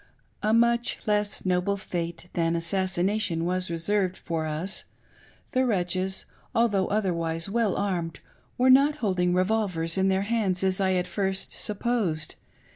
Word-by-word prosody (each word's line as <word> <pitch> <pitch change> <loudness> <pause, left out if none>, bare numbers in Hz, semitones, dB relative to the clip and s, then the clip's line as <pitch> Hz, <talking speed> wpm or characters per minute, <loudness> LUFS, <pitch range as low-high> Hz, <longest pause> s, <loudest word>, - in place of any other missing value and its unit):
A 215 - +1
much 235 +1 +2
less 210 -2 0
noble 185 +2 +1
fate 170 -2 -4
than 165 -1 +1
assassination 185 0 0
was 185 0 0
reserved 185 +3 0
for 160 -2 -3
us. 160 +6 -2 0.7
The 255 - +2
wretches, 190 -4 0 0.3
although 205 -5 +3
otherwise 170 -5 -1
well 225 -3 +1
armed, 170 -6 -2 0.4
were 255 +1 +5
not 280 +3 +6
hold* 195 -8 -1
ing 180 0 +2
revolvers 185 -3 0
in 190 - +3
their 190 0 +2
hands 200 -4 0
as 190 0 +1
I 190 -1 +2
at 180 -1 +1
first 195 -1 -2
supposed. 205 -8 -1
190 Hz, 140 wpm, -27 LUFS, 175-210 Hz, 0.7 s, not